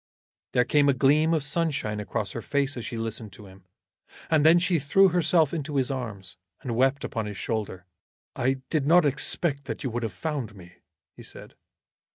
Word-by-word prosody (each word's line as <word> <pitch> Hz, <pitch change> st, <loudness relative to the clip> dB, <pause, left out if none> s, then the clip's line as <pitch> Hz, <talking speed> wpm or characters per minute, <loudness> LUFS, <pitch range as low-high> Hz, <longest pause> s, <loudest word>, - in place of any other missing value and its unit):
There 125 Hz, -, +3 dB
came 145 Hz, +1 st, +3 dB
a -, -, +5 dB
gleam 150 Hz, +5 st, +3 dB
of 160 Hz, -4 st, +1 dB
sunshine 140 Hz, -8 st, -1 dB
across 100 Hz, 0 st, -3 dB
her 115 Hz, -, -5 dB
face 140 Hz, +3 st, -1 dB
as 120 Hz, -, -5 dB
she 115 Hz, -, -5 dB
listened 115 Hz, -1 st, -4 dB
to 105 Hz, -, -12 dB
him, 95 Hz, -1 st, -16 dB, 0.7 s
and 155 Hz, -2 st, +4 dB
then 160 Hz, +2 st, +7 dB
she 175 Hz, -1 st, +2 dB
threw 190 Hz, +7 st, +4 dB
herself 170 Hz, -3 st, +2 dB
into 150 Hz, -2 st, -4 dB
his 135 Hz, -1 st, +1 dB
arms, 105 Hz, -9 st, -6 dB, 0.3 s
and 120 Hz, -3 st, -3 dB
wept 135 Hz, +3 st, +2 dB
upon 110 Hz, -4 st, -3 dB
his 105 Hz, -1 st, -6 dB
shoulder. 100 Hz, -5 st, -4 dB, 0.5 s
"I 130 Hz, +2 st, 0 dB
did 150 Hz, -4 st, 0 dB
not 170 Hz, +1 st, +6 dB
expect 140 Hz, +1 st, -1 dB
that 115 Hz, -4 st, -5 dB
you 130 Hz, -, -2 dB
would 120 Hz, +1 st, -3 dB
have 115 Hz, -2 st, -3 dB
found 140 Hz, -10 st, -4 dB
me," 90 Hz, -2 st, -15 dB, 0.4 s
he -, -, -12 dB
said. -, -, -9 dB
135 Hz, 195 wpm, -26 LUFS, 110-150 Hz, 0.7 s, then